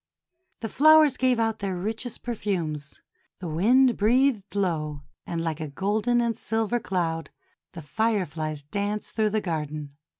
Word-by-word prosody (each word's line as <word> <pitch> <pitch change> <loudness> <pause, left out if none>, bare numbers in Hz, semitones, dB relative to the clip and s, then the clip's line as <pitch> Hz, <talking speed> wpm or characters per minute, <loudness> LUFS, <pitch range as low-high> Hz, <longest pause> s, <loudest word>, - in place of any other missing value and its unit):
The 225 - -2
flowers 310 +1 +6
gave 255 -2 +2
out 225 -1 0
their 195 -2 -2
richest 220 +6 -4
perfumes, 170 -11 -3 0.4
the 180 - -6
wind 235 +10 +4
breathed 225 -2 +2
low, 155 -7 -1 0.2
and 165 -1 -2
like 160 -1 -2
a 155 - -4
gold 205 - -2
and 240 -1 +2
silver 225 +1 -1
cloud 165 -6 -2 0.4
the 170 -3 -8
Fireflies 160 -7 -1
danced 205 +7 -3
through 215 -1 +2
the 215 +1 0
garden. 150 -4 -4
200 Hz, 140 wpm, -26 LUFS, 160-230 Hz, 0.4 s, flowers